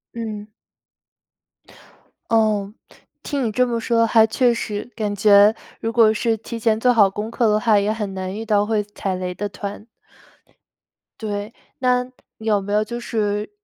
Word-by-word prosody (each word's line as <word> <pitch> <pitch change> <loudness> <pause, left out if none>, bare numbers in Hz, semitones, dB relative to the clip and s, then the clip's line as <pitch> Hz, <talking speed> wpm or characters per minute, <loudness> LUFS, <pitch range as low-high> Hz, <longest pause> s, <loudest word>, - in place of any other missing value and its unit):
嗯。 215 -3 -5 1.8
哦， 215 -3 +1 0.5
听 280 -4 -2
你 220 - -1
这 250 +3 +2
么 235 -1 -1
说， 230 0 +2
还 225 0 +5
确 240 +3 +2
实 210 -1 -4
感 210 -2 -2
觉 205 +1 +6 0.2
如 225 0 -3
果 225 -2 +5
是 225 +1 0
提 230 +2 -7
前 220 -1 +1
做 250 +2 +4
好 210 -4 +6
功 210 +3 -5
课 230 0 +1
的 210 0 +3
话， 215 -2 +3
也 205 +2 0
很 210 -3 -4
难 185 0 -4
遇 220 - -5
到 210 -2 +2
会 215 -1 0
踩 200 -2 -4
雷 180 0 -4
的 205 +3 -4
团。 200 +2 -7 1.4
对， 210 0 -4 0.3
那 250 -1 +2 0.3
有 220 -2 +1
没 205 +1 -4
有 210 +1 +3
就 235 +2 -6
是 210 -3 -2
215 Hz, 175 characters per minute, -21 LUFS, 205-230 Hz, 1.8 s, 觉